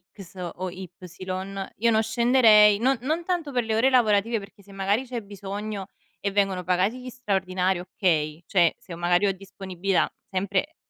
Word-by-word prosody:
X 190 -2 -12 0.2
o 185 0 -4
Y, 185 0 -9 0.9
io 230 +1 +3
non 220 0 +3
scenderei, 220 -3 +5
non 260 +2 +2
non 315 +6 -1
tanto 345 -5 -2
per 245 -1 +1
le 220 -1 0
ore 255 +4 +4
lavorative, 225 -2 +3
perché 200 0 -14
se 200 - -17
magari 200 +6 0
c'è 245 -2 -5
bisogno 200 0 -6 0.3
e 200 - -2
vengono 195 -2 0
pagati 185 +7 0
gli 255 - -7
straordinari, 190 -6 -1
okay, 165 -3 -1
cioè 175 -4 +3
se 175 - -9
magari 175 +3 +2
ho 195 - +1
disponibilità 195 -1 -2 0.2
sempre 200 - -1
200 Hz, 165 wpm, -25 LUFS, 185-230 Hz, 0.9 s, scenderei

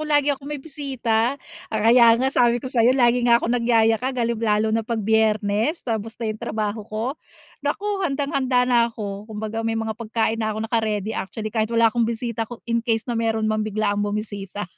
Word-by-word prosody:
lagi 295 -1 +2
akong 275 +1 -8
may 295 - -3
bisita. 265 -5 -1 0.3
Kaya 230 +2 +5
nga 265 +3 0
sabi 240 -2 +4
ko 245 - -7
sayo 250 0 +3
lagi 245 -1 +4
nga 235 - +7
akong 235 0 -1
nagyayakag 235 +1 +2
halim 235 -2 -1
lalo 215 -1 +1
na 225 - +2
pag 225 -1 -3
Biyernes. 220 - +1
Tapos 225 -1 -3
na 225 -2 -2
yung 215 - -12
trabaho 215 0 -2
ko. 215 +1 -3 0.6
Naku 290 +8 -2 0.2
handang-handa 275 -6 +1
na 240 -2 +3
ako 205 -2 -7
kumbaga 220 +1 -4
may 225 0 -1
mga 220 0 -2
pagkain 225 0 -1
na 220 - 0
ako 215 +1 -3
naka-ready, 220 -2 -1
actually 215 +2 -5
kahit 220 -1 0
wala 230 -1 +3
akong 235 -1 +1
bisita 230 -1 -3
ko 240 - -10
in-case 230 -1 0
na 245 - -3
meron 225 -1 0
mang 215 0 0
biglaang 210 -1 -1
bumisita. 205 -1 -4
225 Hz, 185 wpm, -23 LUFS, 215-245 Hz, 0.6 s, nga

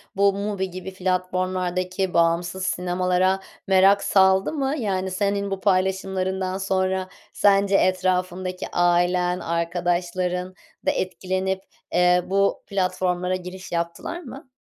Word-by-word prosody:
bu 200 0 +4
MUBI 200 -1 -2
gibi 185 +1 -7
platformlardaki 185 0 -1
bağımsız 170 +2 +1
sinemalara 180 +1 +1 0.3
merak 195 +1 +5
saldı 190 +4 +4
mı? 280 -1 -1
Yani, 190 -4 -1
senin 200 +1 -1
bu 195 - -2
paylaşımlarından 190 -1 0
sonra, 190 -1 0 0.3
sence 200 -1 +3
etrafındaki 185 0 0
ailen, 175 +1 +2
arkadaşların 175 +2 -1 0.3
da - - +4
etkilenip, 190 +1 -2 0.3
eee, 180 0 +4
bu 195 +1 +1
platformlara 185 -1 0
giriş 185 +1 -8
yaptılar 170 - -3
mı? 270 -3 -11
185 Hz, 105 wpm, -23 LUFS, 180-190 Hz, 0.3 s, merak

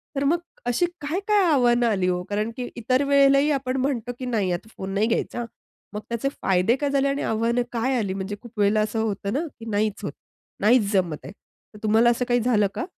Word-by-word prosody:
तर 275 - 0
मग 330 +5 +2 0.3
अशी 245 +9 +2 0.2
काय-काय 390 +7 +1
आव्हानं 240 -3 +3
आली 190 -4 +1
हो? 180 0 0
कारण 210 +2 -1
की 245 - -3
इतर 255 +4 +1
वेळेलाही 280 +1 +4
आपण 265 -2 -1
म्हणतो, 255 -3 -1
की 255 - -4
"नाही, 210 -7 0
आता 175 +5 -4
फोन 190 0 -5
नाही 210 +3 +2
घ्यायचा 240 - -1
हां!" 235 - -2 0.5
मग 210 - -4
त्याचे 235 +4 -1
फायदे 190 +6 +3
काय 285 +1 -1
झाले 275 0 +2
आणि 275 +1 -1
आव्हानं 230 +2 +1
काय 250 +2 0
आली? 200 -4 -1
म्हणजे 195 +1 -4
खूप 235 -2 -12
वेळेला 205 +1 +3
असं 215 +1 -1
होतं 200 -2 -2
ना, 275 - +1 0.2
की 225 - -9
नाहीच 210 0 -1
होत. - - -3 0.5
नाहीच 215 -1 +4
जमत 175 -6 +1
आहे. - - -7 0.4
तर 210 - -12
तुम्हाला 220 +3 +4
असं 240 +1 0
काही 245 - +3
झालं 215 -4 +3
का? 350 - -2
235 Hz, 215 wpm, -24 LUFS, 210-265 Hz, 0.5 s, वेळेलाही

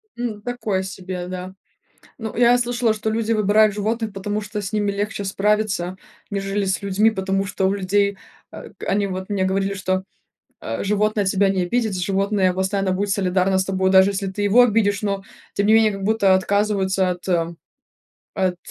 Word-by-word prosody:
Ну, 235 -3 -4
такое 215 -5 -2
себе, 185 -1 -6
да. 185 0 -6 0.7
Ну, 220 -2 -5
я 240 +1 +5
слышала, 240 -2 +1
что 215 0 -3
люди 225 0 -1
выбирают 215 -1 +4
животных, 220 +1 -2
потому 205 +2 -3
что 210 0 -5
с 200 - -5
ними 205 -1 0
легче 205 +1 -3
справиться, 195 -2 0 0.3
нежели 200 0 -2
с 190 -1 -1
людьми. 200 +3 +3
Потому 195 -1 -1
что 190 0 -2
у 195 - +1
людей, 200 +1 +1 0.3
э, - - -10
к - - -12
они 200 +1 +1
вот 190 0 -5
мне 195 -2 0
говорили, 195 +1 0
что, 185 -1 -1 0.6
э, 115 - -4
животное 210 +1 +1
тебя 195 +1 +2
не 190 -2 +1
обидит, 220 +1 0
животное 195 +1 +1
постоянно 190 +1 0
будет 200 +2 -1
солидарно 190 -1 +1
с 190 - +1
тобой, 190 0 0
даже 190 +1 +6
если 195 0 -3
ты 190 +2 -4
его 205 +5 +6
обидишь. 210 -3 +2
Но 200 -1 -1 0.3
тем 200 - +1
не 215 - +4
менее 220 -1 +5
как 195 0 -6
будто 200 -2 +3
отказываются 190 -1 +1
от 180 0 -6 1.1
от, 185 -1 +1
200 Hz, 180 wpm, -21 LUFS, 190-210 Hz, 1.1 s, даже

